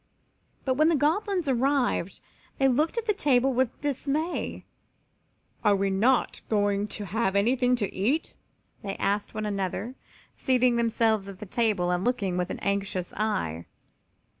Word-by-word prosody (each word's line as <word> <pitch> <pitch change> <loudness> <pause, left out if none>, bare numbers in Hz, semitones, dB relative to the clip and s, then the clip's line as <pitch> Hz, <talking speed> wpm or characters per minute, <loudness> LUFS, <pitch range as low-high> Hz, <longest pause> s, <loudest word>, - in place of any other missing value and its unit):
But 260 - +2
when 310 +2 +5
the 335 - +3
Goblins 345 +4 +1
arrived 260 -7 +1 0.4
they 270 - +3
looked 300 - +1
at 465 - -1
the 425 - +2
table 270 -8 +2
with 255 -1 -1
dismay. 290 +4 -2 1.0
"Are 205 -2 +4
not 235 +7 +2
they 220 - +1
going 205 0 +1
to 205 0 -5
have 200 0 -1
anything 245 +4 +3
to 205 -5 -2
eat?" 250 +12 -1 0.5
they 195 -1 -4
asked 205 +2 -1
one 215 0 -2
another, 200 +4 -3 0.4
seating 250 -2 +2
themselves 225 -3 +1
at 195 -2 -8
the 210 - -8
table 205 -4 0
and 180 +1 0
looking 220 -7 0
with 180 -1 -1
anxious 195 -2 -2
eye. 190 - -2
230 Hz, 145 wpm, -27 LUFS, 200-265 Hz, 1.0 s, when